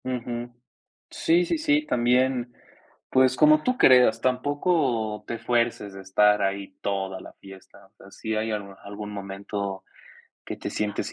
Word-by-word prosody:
Ujú, 120 -1 -4 0.6
sí, 175 +2 +2
sí, 325 - -1
sí. 300 -1 +2
También, 125 - +1 0.6
pues 130 0 +3
como 155 +1 +5
tú 255 0 0
creas, 125 - +6
tampoco 130 -4 0
te 115 - -4
fuerces 115 -4 -1
de 95 - -9
estar 105 +2 +3
ahí 100 0 -2
toda 95 -1 -3
la - - -12
fiesta, 95 0 -15
o - - -39
sea, 100 -2 -17
si 110 +2 -4
hay 110 +1 -1
al 100 -2 -5
algún 105 +1 -7
momento 100 0 -5 0.6
que - - -6
te - - -6
sientes 105 -1 -3
110 Hz, 150 wpm, -25 LUFS, 100-130 Hz, 0.6 s, creas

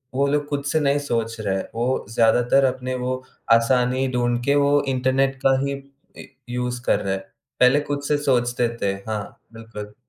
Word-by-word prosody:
वो 140 +1 +2
लोग 145 +1 0
खुद 145 -1 -2
से 155 +2 +1
नहीं 145 -1 +2
सोच 115 -5 -2
रहे 100 -2 -1
हैं, 95 - -3
वो 120 +3 -1
ज़्यादातर 120 +4 +3
अपने 130 0 -2
वो 130 +1 -3 0.3
आसानी 125 +3 +2
ढूँढ़ 120 -1 +1
के 140 - +3
वो 145 0 +3
इंटरनेट 135 +1 +1
का 135 0 +5
ही 140 - -2 0.4
इ - - -9 0.2
यूज़ 125 0 -3
कर - - +2
रहे 95 -1 -2
हैं। 95 - -6 0.4
पहले 125 +3 +5
खुद 145 0 -2
से 150 - +2
सोचते 125 -4 +1
थे। 100 -1 +1 0.2
हाँ, 105 -2 -5
बिल्कुल। 105 -2 -9
125 Hz, 185 wpm, -22 LUFS, 115-140 Hz, 0.4 s, का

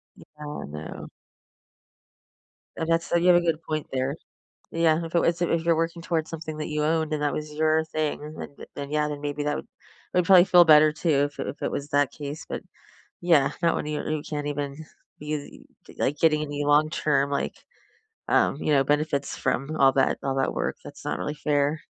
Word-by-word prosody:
Yeah. - - -16
I 150 0 -6
know. 75 +2 -8 1.7
And 160 0 -3
that's 165 0 +1
you 170 +1 +3
have 180 - +7
a - - +3
good 165 -1 0
point 155 -1 -3
there. 130 +2 -1 0.6
Yeah. 165 0 +2
If 165 - -7
it - - +6
was 170 +1 +1
if 165 -1 +1
you're 170 -1 +4
working 165 +1 -2
towards 165 -2 -1
something 160 -1 -6
that 155 - -4
you 150 0 -1
owned 160 0 0
and 150 - -1
that 145 - 0
was 150 0 -5
your 155 +1 +2
thing, 155 -1 -3
then 140 - -8
then - - -10
then, 140 0 -6
yeah, 150 0 +1
then 145 -1 -5
maybe 145 0 -3
that 150 0 0
would - - -7 0.5
that - - +2
would 180 - +1
probably 185 -1 +7
feel 180 -2 +7
better, 155 -1 +7
too, 150 -3 +1
if 145 - -9
it - - -3
if 145 - -7
it - - -1
was 145 +1 -4
that 145 -1 +2
case. 145 +1 -7
But, - - -4 0.6
yeah, 160 -6 +4
not 170 - +3
when - - -3
you 150 0 -3
you 155 -1 -1
can't 145 -1 -3
even 145 -1 -3 0.4
be, 150 -1 -6 0.3
like, 145 - 0
getting 155 -2 +3
any 145 -1 -3
long 150 +1 +4
term, 140 -3 +1
like, 140 - -2 0.7
um, - - +2
you 155 - -1
know, 135 - +4
benefits 145 0 0
from 135 +4 -1
all 135 -2 +6
that 135 0 +2
all 135 -1 -1
that 135 0 0
work. - - -2
That's - - -11
not - - -1
really 150 - -3
fair. 145 +1 0
150 Hz, 215 wpm, -25 LUFS, 145-160 Hz, 1.7 s, have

